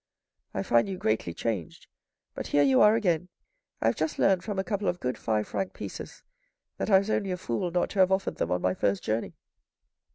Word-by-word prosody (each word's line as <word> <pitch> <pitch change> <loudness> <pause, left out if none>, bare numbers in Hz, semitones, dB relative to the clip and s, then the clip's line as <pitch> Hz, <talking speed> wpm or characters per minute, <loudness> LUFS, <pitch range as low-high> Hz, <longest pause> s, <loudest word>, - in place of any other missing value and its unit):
" - - -51
I 95 - -1
find 120 - +3
you 190 - -4
greatly 110 - 0
changed, 95 -2 -4 0.5
but - - -5
here 145 - +3
you 135 -2 +4
are 210 +1 +7
again. 180 -5 0 0.5
I - - -1
have 115 - +3
just 155 0 -2
learned 190 -2 +3
from 205 -3 -4
a 190 - +1
couple 205 0 -2
of 180 - 0
good 125 -1 -2
five 110 -1 -1
franc 190 - -3
pieces - - -8 0.5
that - - -2
I 195 - +7
was 200 +3 0
only 200 - 0
a 180 - -1
fool 170 +3 -2
not 175 +1 0
to 200 - -3
have 185 0 +5
offered 190 0 0
them 85 - -1
on 90 0 -1
my 90 0 +2
first 100 +1 0
journey." 110 +1 -2
165 Hz, 225 wpm, -28 LUFS, -, 0.5 s, are